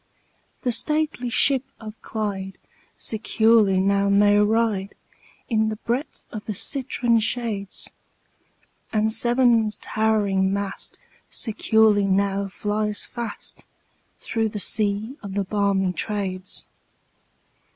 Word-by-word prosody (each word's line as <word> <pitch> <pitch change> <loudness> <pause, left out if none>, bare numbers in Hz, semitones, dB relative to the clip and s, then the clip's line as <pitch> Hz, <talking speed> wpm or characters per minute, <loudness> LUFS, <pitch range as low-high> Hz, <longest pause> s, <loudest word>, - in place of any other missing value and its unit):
The 250 - +1
stately 300 -1 0
ship 265 +2 +4 0.2
of 215 -1 -8
Clyde 195 -3 -4 0.4
securely 220 -2 +2
now 200 +1 +2
may 205 +1 +4
ride, 210 -2 +1 0.5
In 220 -2 +1
the 215 - -3
breath 240 +7 -4
of 215 -2 -7
the 210 - -3
citron 240 0 +1
shades; 220 -3 -3 1.0
And 220 0 +1
Severn's 235 -2 +3
towering 205 -3 +1
mast 200 0 -4 0.3
securely 220 -2 +2
now 195 +1 +1
flies 210 +1 -1
fast, 235 -3 -7 0.5
Through 225 -1 -1
the 210 - -5
sea 215 +5 +1
of 200 -2 -7
the 200 - +1
balmy 195 -1 0
Trades. 185 0 -4
215 Hz, 105 wpm, -23 LUFS, 200-225 Hz, 1.0 s, ship